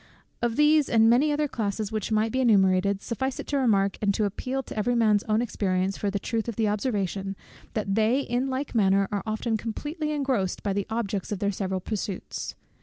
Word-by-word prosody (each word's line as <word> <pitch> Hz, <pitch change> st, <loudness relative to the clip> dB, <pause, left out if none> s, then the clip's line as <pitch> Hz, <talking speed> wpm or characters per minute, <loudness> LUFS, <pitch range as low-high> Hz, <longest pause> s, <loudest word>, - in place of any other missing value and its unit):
Of 235 Hz, -1 st, 0 dB
these 300 Hz, 0 st, +4 dB
and 225 Hz, -1 st, +5 dB
many 280 Hz, +6 st, +4 dB
other 295 Hz, 0 st, +1 dB
classes 215 Hz, -4 st, -3 dB
which 215 Hz, -1 st, -3 dB
might 220 Hz, +1 st, +2 dB
be 260 Hz, -, 0 dB
enumerated, 195 Hz, -3 st, +3 dB
suffice 265 Hz, +3 st, -3 dB
it -, -, -4 dB
to 285 Hz, -, +1 dB
remark, 200 Hz, -7 st, +2 dB
and 205 Hz, -1 st, +3 dB
to 215 Hz, -, +1 dB
appeal 255 Hz, +7 st, -3 dB
to -, -, -9 dB
every 240 Hz, +3 st, +1 dB
man's 215 Hz, -3 st, +4 dB
own 215 Hz, +1 st, +2 dB
experience 190 Hz, -4 st, -1 dB
for 205 Hz, -, -1 dB
the 200 Hz, -, -1 dB
truth 225 Hz, +3 st, -2 dB
of 235 Hz, -, -3 dB
the 220 Hz, 0 st, +1 dB
observation, 200 Hz, -3 st, -1 dB, 0.4 s
that 205 Hz, -3 st, -1 dB
they 225 Hz, +6 st, +3 dB
in 250 Hz, 0 st, -1 dB
like 265 Hz, +2 st, -3 dB
manner 195 Hz, -3 st, +3 dB
are 205 Hz, -1 st, -1 dB
often 220 Hz, +1 st, -1 dB
completely 300 Hz, +8 st, -4 dB
engrossed 265 Hz, -10 st, -1 dB
by 200 Hz, -, 0 dB
the 200 Hz, 0 st, -2 dB
objects 215 Hz, -4 st, -2 dB
of 205 Hz, -, -1 dB
their 200 Hz, +1 st, 0 dB
several 190 Hz, -1 st, -2 dB
pursuits. 200 Hz, -1 st, -4 dB
215 Hz, 205 wpm, -26 LUFS, 200-245 Hz, 0.4 s, and